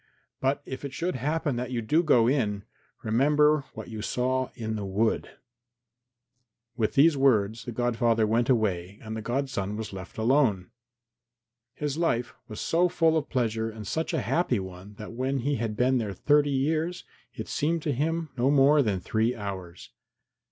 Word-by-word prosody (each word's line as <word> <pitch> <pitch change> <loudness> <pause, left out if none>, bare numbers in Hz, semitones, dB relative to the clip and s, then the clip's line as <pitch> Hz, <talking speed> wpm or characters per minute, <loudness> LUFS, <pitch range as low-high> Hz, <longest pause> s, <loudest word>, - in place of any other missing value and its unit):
But 135 +2 0
if 130 +1 -7
it 140 -1 -5
should 175 +4 -2
happen 145 0 -1
that 125 0 -3
you 125 -2 -2
do 155 +9 +3
go 125 -9 +4
in, 105 -7 0 0.4
remember 145 +5 +3
what - - -7
you 110 -2 -6
saw 130 +3 -1
in 110 -1 -3
the 105 - -4
wood." 100 +4 0 1.5
With 110 0 -1
these 150 +3 +6
words 115 -5 +2
the 120 - -4
godfather 115 -1 +1
went 115 +3 +1
away, 100 -6 0
and 110 0 -5
the 110 - -4
godson 120 -5 -2
was 110 -2 -6
left 95 -1 -9
alone. 110 -5 +2 1.0
His 150 +1 -3
life 125 -8 0
was 110 - -8
so 175 +2 +2
full 165 -2 +2
of 160 - -1
pleasure 115 -4 0
and 110 -1 -9
such 160 +11 -2
a - - 0
happy 160 - +1
one 95 +2 -9
that 105 +2 -8
when 130 +2 -1
he 145 +3 0
had 110 -2 -3
been 130 +1 +3
there 105 -4 -3
thirty 145 +8 +3
years 155 +6 0 0.3
it - - -6
seemed 160 +2 -1
to 150 - 0
him 160 +4 -1
no 125 +1 +2
more 145 +1 +5
than 105 -7 0
three 110 +5 0
hours. 95 -5 -7
125 Hz, 175 wpm, -27 LUFS, 110-145 Hz, 1.5 s, these